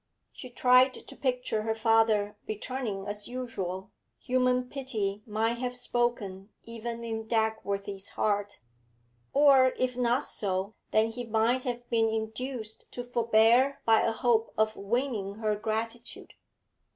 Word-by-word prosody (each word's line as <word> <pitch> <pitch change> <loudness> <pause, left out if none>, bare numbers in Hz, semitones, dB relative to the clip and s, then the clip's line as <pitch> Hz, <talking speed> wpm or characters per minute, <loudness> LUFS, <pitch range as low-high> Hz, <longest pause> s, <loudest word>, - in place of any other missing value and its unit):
She 255 - -9
tried 250 +1 +5
to - - -11
picture 250 -5 -1
her 220 +1 -1
father 220 -2 +3
returning 215 -2 -3
as 205 0 -4
usual; 195 -7 -5 0.3
human 250 -1 +1
pity 220 -8 -3
might 225 +2 0
have 250 0 -2
spoken 235 -6 -2
even 230 0 -6
in 225 -1 -4
Dagworthy's 200 -3 -1
heart; 205 -1 0 0.7
or 270 -2 +5
if 255 -1 0
not 245 +1 +1
so, 195 0 -1 0.2
then 220 +1 +2
he 245 +2 -5
might 230 +3 +1
have 245 -1 -4
been 225 -1 +3
induced 220 +1 -4
to 245 - -4
forbear 240 +3 +3
by 225 -1 +5
a 230 - +2
hope 225 0 +1
of 215 0 +2
winning 210 -1 -2
her 215 -1 0
gratitude. 225 +2 -4
225 Hz, 130 wpm, -29 LUFS, 215-250 Hz, 0.7 s, tried